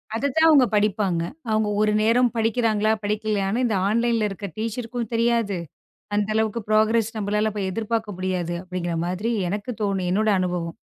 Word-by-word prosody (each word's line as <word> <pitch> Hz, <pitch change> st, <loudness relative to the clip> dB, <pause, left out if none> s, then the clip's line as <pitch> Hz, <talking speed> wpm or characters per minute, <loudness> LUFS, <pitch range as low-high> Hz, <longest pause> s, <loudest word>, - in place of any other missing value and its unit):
அத 250 Hz, -, -2 dB
தான் 320 Hz, 0 st, +5 dB
அவங்க 280 Hz, -5 st, +6 dB
படிப்பாங்க. 200 Hz, -4 st, +1 dB, 0.3 s
அவங்க 215 Hz, 0 st, +1 dB
ஒரு 215 Hz, -, +3 dB
நேரம் 235 Hz, +2 st, +3 dB
படிக்கிறாங்களா 220 Hz, -2 st, +1 dB
படிக்கலையானு 210 Hz, +1 st, 0 dB
இந்த 220 Hz, -, 0 dB
ஆன்லைன்ல 230 Hz, 0 st, +1 dB
இருக்கிற 195 Hz, 0 st, -6 dB
டீச்சர்க்கும் 230 Hz, +1 st, -4 dB
தெரியாது. 230 Hz, -4 st, +1 dB, 0.6 s
அந்த 205 Hz, 0 st, +1 dB
அளவுக்கு 220 Hz, +1 st, 0 dB
ப்ரோக்ரெஸ் 220 Hz, +1 st, +3 dB
நம்மளால 210 Hz, +1 st, 0 dB
அப்ப 210 Hz, -, -4 dB
எதிர்பார்க்க 220 Hz, 0 st, -2 dB
முடியாது 180 Hz, -2 st, -2 dB
அப்படிங்கற 175 Hz, -2 st, -3 dB
மாதிரி 185 Hz, +6 st, -2 dB, 0.2 s
எனக்குத் 210 Hz, +4 st, -4 dB
தோணு 195 Hz, -3 st, 0 dB
என்னோட 215 Hz, +2 st, +1 dB
அனுபவம். 175 Hz, -2 st, -2 dB
215 Hz, 150 wpm, -23 LUFS, 195-230 Hz, 0.6 s, அவங்க